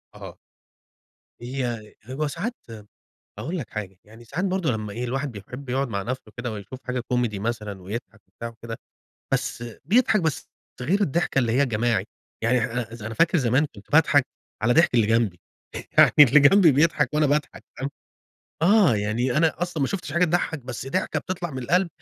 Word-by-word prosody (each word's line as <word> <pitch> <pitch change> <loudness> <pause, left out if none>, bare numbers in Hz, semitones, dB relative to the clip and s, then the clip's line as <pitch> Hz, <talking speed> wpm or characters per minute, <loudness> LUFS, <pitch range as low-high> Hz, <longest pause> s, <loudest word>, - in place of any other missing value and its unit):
أها. - - -10 1.0
هي 120 -4 -4
هو 140 +4 -2
ساعات 200 - -3 0.2
م 110 -2 -9 0.6
هاقول 165 +11 -3
لك 125 - -6
حاجة 95 -3 -6
يعني 110 +3 -15
ساعات 165 - -3
برضه 185 -6 0
لمّا 105 -2 -4
إيه 120 +3 -4
الواحد 135 +2 -2
بيحب 125 +7 -9
يقعُد 135 +1 0
مع 100 -3 -2
نفسه 120 -2 -5
كده 115 -1 -4
ويشوف 110 +5 -8
حاجة 125 0 -2
كوميدي 120 -4 -1
مثلًا 105 -3 -4
ويضحك 110 +2 -7 0.2
بتاع 115 - -4
وكده، 115 0 -8 0.6
بس 120 - -1 0.2
بيضحك 220 -2 +3
بس 160 -3 -2 0.3
ده 125 - -5
غير 195 +5 +2
الضحكة 165 -4 +1
اللي 115 -3 +1
هي 135 +4 +3
الجماعي، 115 -4 0 0.4
يعني 125 +2 +3
احنا 120 +1 -1
أ - - -12
أز 115 -3 -9
أنا 110 +1 -5
فاكر 165 +4 +3
زمان 130 +3 +2
كنت 100 - -15
باضحك 145 -3 +5 0.4
على 120 +3 +3
ضحك 165 -4 +4
اللي 110 -3 +4
جنبي، 115 -6 +1 0.6
يعني - - +8
اللي 150 +1 +9
جنبي 165 +3 +6
بيضحك 150 -1 +2
وأنا 150 0 +3
باضحك 145 +1 -1
فاهم؟ 135 +1 -3 0.7
آه، 185 - +5
يعني 115 +6 -1
أنا 165 +1 +2
أصلًا 175 -4 -2
ما 135 - +2
شُفتش 180 -7 -4
حاجة 170 +2 +3
تضحّك 170 -1 0
بس 130 -1 -7
ضحكة 185 +8 -1
بتطلع 175 -3 -4
من 130 -2 -5
القلب 180 +7 +2
130 Hz, 185 wpm, -24 LUFS, 115-155 Hz, 1.0 s, اللي